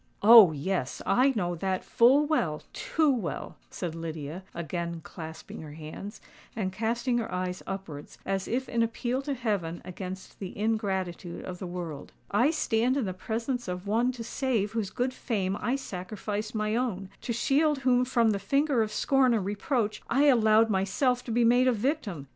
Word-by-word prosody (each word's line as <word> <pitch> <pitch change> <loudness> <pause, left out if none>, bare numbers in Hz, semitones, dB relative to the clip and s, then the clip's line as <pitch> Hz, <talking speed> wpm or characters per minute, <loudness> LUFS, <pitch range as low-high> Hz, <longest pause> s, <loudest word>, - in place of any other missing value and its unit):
"Oh! 220 -5 +10
yes,—I 190 - +1
know 175 -5 0
that 185 +2 -2
full 265 +6 +5
well—too 310 - 0
well," 225 -10 -3
said 175 -3 -4
Lydia, 165 0 -5
again 170 0 -4
clasping 160 -2 -9
her 150 -2 -9
hands, 160 +6 -8 0.4
and 190 -4 -2
casting 235 +4 0
her 230 - -4
eyes 180 0 -3
upwards, 180 -7 -7
as 195 -1 -1
if 260 +2 -1
in 235 - 0
appeal 240 +3 -1
to 280 0 -3
heaven 200 -9 -2
against 185 +1 -7
the 190 -2 -7
ingratitude 190 -5 -2
of 180 -1 -6
the 185 - -5
world. 175 -4 -6 0.2
"I 240 +8 +4
stand 255 -4 +1
in 265 - 0
the 185 - -3
presence 230 +6 -3
of 180 +1 -4
one 230 +5 +2
to 240 -2 -6
save 235 -4 -1
whose 220 -4 -2
good 250 +6 -1
fame 200 -7 -1
I 245 - +1
sacrificed 210 -1 -5
my 215 0 0
own—to 225 -2 -3
shield 290 +6 +2
whom 250 -1 +3
from 235 -3 +3
the 200 - -1
finger 275 +3 +2
of 215 -1 -1
scorn 260 +1 +3
and 205 -4 -1
reproach, 210 +2 -1
I 275 +5 +3
allowed 225 -4 +5
myself 245 +7 +1
to 235 - -4
be 235 +1 +3
made 245 +2 +5
a - - +5
victim! 215 - -2
215 Hz, 170 wpm, -28 LUFS, 185-245 Hz, 0.4 s, Oh